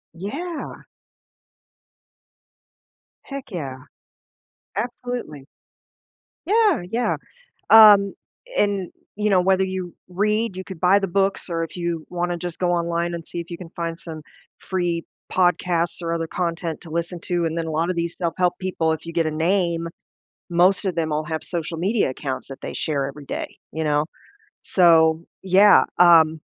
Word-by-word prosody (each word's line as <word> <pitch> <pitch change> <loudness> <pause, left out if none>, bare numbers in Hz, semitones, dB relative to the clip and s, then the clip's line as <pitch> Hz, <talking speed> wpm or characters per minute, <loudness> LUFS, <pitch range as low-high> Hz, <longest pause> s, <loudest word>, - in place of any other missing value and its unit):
Yeah! 300 - -6 2.4
Heck, 275 -1 -8
yeah. 140 -7 -5 1.0
Absolutely. 235 - -4 1.0
Yeah, 420 - +3
yeah, 235 +3 0 0.5
um, 205 -3 +8 0.4
and, 200 -3 +1 0.2
you 210 +1 0
know, 190 -3 +4
whether 190 +1 +3
you 185 -2 -5
read, 210 +3 0
you 185 - -5
could 190 -3 -9
buy 185 +4 +5
the 195 - -2
books, 195 +1 0
or 165 -1 -1
if 165 - -7
you 170 -2 -3
wanna 175 0 -2
just 175 0 -6
go 180 -1 +1
online 170 0 0
and 170 -1 -6
see 175 - -6
if 170 - -7
you 170 - -5
can 170 -2 -10
find 165 -1 -3
some 160 -2 -8 0.4
free 175 -3 -2 0.3
podcasts 175 -1 +1
or 165 -1 -2
other 165 -1 -2
content 170 -2 -3
to 170 - -11
listen 170 +2 -3
to, 175 -1 -1
and 165 0 -2
then 165 - -1
a - - -3
lotta 165 +4 0
these 170 -1 -2
self-help 180 0 0
people 180 -4 0
if 160 - -7
you 165 - -7
get 165 -1 +1
a - - -1
name, 170 +1 0 0.6
most 180 +4 +3
of 190 -3 -1
them 160 -2 -1
all 155 +1 -1
have 160 0 -4
social 165 -2 -4
media 200 - +1
accounts 130 0 -5
that 135 - -9
they - - -6
share 140 -3 -1
every 140 +1 -9
day, - - -5 0.2
you 160 0 -2
know? 150 0 +2 0.6
So, 165 -2 +4 0.2
yeah, 190 +2 +6
um 160 -2 +6
175 Hz, 160 wpm, -22 LUFS, 165-190 Hz, 2.4 s, um